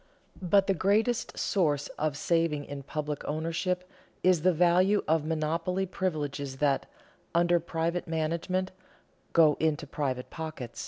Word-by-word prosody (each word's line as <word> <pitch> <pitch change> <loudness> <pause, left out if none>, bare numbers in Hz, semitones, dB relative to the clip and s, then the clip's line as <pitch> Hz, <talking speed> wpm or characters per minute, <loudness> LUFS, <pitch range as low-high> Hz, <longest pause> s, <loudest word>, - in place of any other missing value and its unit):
But 195 +2 +4
the 195 - +2
greatest 215 +6 +1
source 150 -7 +1
of 150 -2 -2
saving 160 -2 +1
in 145 -1 -6
public 150 +1 -4
ownership 165 +4 -2 0.4
is 180 -3 +4
the 185 +3 +4
value 180 +4 +3
of 155 -1 +2
monopoly 165 +4 -1
privileges 150 -7 -3
that, 140 -1 +1 0.5
under 175 0 +4
private 170 +1 -2
management, 170 +4 -1 0.6
go 155 -3 +5
into 155 -1 0
private 135 -3 -3
pockets. 155 -7 -6
165 Hz, 125 wpm, -29 LUFS, 150-180 Hz, 0.6 s, go